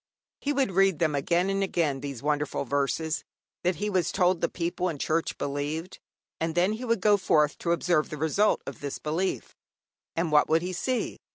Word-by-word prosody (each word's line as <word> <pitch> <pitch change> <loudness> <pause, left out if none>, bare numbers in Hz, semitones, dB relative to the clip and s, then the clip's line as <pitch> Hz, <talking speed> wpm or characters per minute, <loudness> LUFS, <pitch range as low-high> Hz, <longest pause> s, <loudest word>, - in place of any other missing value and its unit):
He 290 - -1
would 275 -7 +1
read 195 -2 +3
them 155 -2 +1
again 170 +6 +1
and 195 0 0
again, 165 -8 0
these 140 -3 -6
wonderful 150 -1 -1
verses, 145 +4 -1 0.4
that 180 0 +1
he 210 - -2
was 185 -5 +1
told 180 -2 +2
the - - +1
people 175 +1 -2
and 150 -4 -5
Church 160 +3 0
believed, 145 +5 -3 0.4
and 165 0 -1
then 180 +4 +3
he 235 +4 -5
would 230 -4 +1
go 205 0 +5
forth 150 -6 +2
to 170 - -1
observe 170 -2 +2
the 150 - -5
result 160 +8 +2
of - - -7
this 140 -1 -4
belief. 165 +5 -2 0.6
And 165 -1 0
what 150 -1 +4
would 160 +2 +3
he 185 +1 -3
see? 255 +7 -2
170 Hz, 195 wpm, -27 LUFS, 150-190 Hz, 0.6 s, go